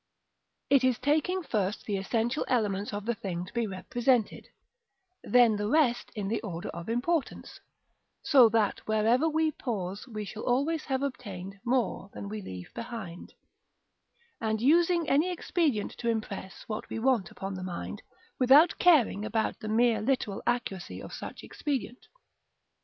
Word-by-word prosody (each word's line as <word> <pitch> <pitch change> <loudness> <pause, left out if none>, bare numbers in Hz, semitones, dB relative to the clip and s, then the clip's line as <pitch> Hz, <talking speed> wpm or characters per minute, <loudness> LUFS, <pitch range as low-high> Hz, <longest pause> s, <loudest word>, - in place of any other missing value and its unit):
It 275 -2 +5
is 255 -2 +3
taking 310 +8 +1
first 210 -7 -2
the 205 - -1
essential 230 +7 0
elements 205 -4 0
of 205 0 -5
the 235 - +1
thing 180 -5 -4
to 185 - -14
be 235 -2 0
represented, 235 +4 0 0.8
then 240 -3 +5
the 205 0 -1
rest 245 -2 +2
in 205 -2 -3
the 225 +3 -1
order 175 -6 -5
of 170 +4 -7
importance 270 +6 -2 0.6
(so 260 -6 +7
that 215 -2 +1
wherever 225 +8 +3
we 315 0 +1
pause 200 -6 -4
we 215 -3 -5
shall 215 +2 -7
always 285 +6 0
have 265 0 -1
obtained 195 -8 -6
more 240 -5 0
than 200 - -6
we 215 0 -5
leave 90 - -9
behind), 220 -8 -7 1.0
and 220 -1 -1
using 335 +5 +3
any 305 +6 +3
expedient 320 - 0
to 235 - -1
impress 210 -4 -4
what 215 -1 -5
we - - -4
want 230 -5 +1
upon 195 0 -6
the 185 - -6
mind, 185 -1 -5 0.4
without 275 +6 +6
caring 290 - +4
about 220 0 -1
the 215 - -5
mere 225 -1 +3
literal 215 -4 -1
accuracy 240 -7 -2
of - - -9
such - - -7
expedient. 265 -3 -4
230 Hz, 150 wpm, -29 LUFS, 205-265 Hz, 1.0 s, so